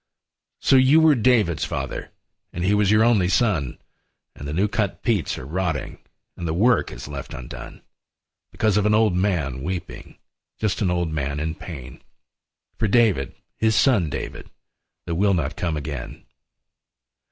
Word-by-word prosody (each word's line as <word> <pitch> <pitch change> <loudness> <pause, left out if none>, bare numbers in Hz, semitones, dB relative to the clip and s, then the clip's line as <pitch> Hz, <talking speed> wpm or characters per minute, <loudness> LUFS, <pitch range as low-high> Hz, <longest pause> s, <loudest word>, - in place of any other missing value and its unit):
lO 135 - +8
you 135 +5 +6
were 160 -1 +6
David's 110 - +2
father, - - -4 0.4
And 85 - -4
he 95 +3 +2
was 105 -1 +3
your 105 +1 +5
only 110 -7 +3
son, 95 - +1 0.6
And 70 - -8
the - - -4
new 95 +6 +2
cut 105 -1 -2
peats 110 -8 0
are 65 - -7
rotting 80 -1 -3 0.4
And 85 - -5
the 80 - -1
work 115 +7 +3
is - - -8
left 70 -2 -7
undone. - - -9 0.7
Because 110 -2 +1
of 105 0 +2
an 105 - +3
old 110 -3 +3
man 85 -9 0
weeping, 90 +3 -6 0.4
Just 110 0 -1
an 95 - +2
old 85 -2 0
man 70 -1 -2
in 80 +1 -2
pain. 70 -8 -9 0.8
For 110 - +2
David, 100 - +2 0.2
his 110 -1 +2
son 105 - +3
David, - - -6 0.6
That 85 - -3
will 100 +3 +2
not 75 -4 -2
come 85 -3 -2
again. 70 -4 -6
90 Hz, 160 wpm, -23 LUFS, 75-105 Hz, 0.8 s, lO